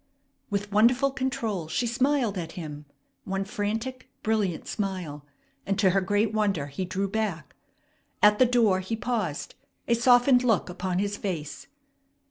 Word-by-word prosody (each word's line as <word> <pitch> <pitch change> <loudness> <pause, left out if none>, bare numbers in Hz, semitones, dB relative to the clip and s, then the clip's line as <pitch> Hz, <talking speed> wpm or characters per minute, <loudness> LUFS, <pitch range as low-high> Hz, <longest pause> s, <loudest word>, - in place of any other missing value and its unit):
With 205 0 -2
wonderful 245 +6 +4
control 230 -10 -2
she 160 +10 -1
smiled 250 -2 +1
at 170 -3 -5
him, 150 -4 -7 0.4
one 195 0 -2
frantic, 225 +6 -3
brilliant 210 -6 0
smile; 180 -8 -4 0.4
and 195 -1 -1
to 195 -3 +4
her 195 +1 +2
great 205 +3 +1
wonder 200 -9 +1
he 145 +6 -4
drew 190 +2 -2
back. 195 -7 -3 0.6
At 210 0 +5
the 255 - +6
door 230 -6 +3
he 190 +5 -3
paused, 220 -10 -3 0.3
a 235 - +3
softened 245 +1 +5
look 225 -7 +2
upon 180 0 -2
his 205 +1 -1
face. 165 - -5
205 Hz, 145 wpm, -27 LUFS, 185-235 Hz, 0.6 s, the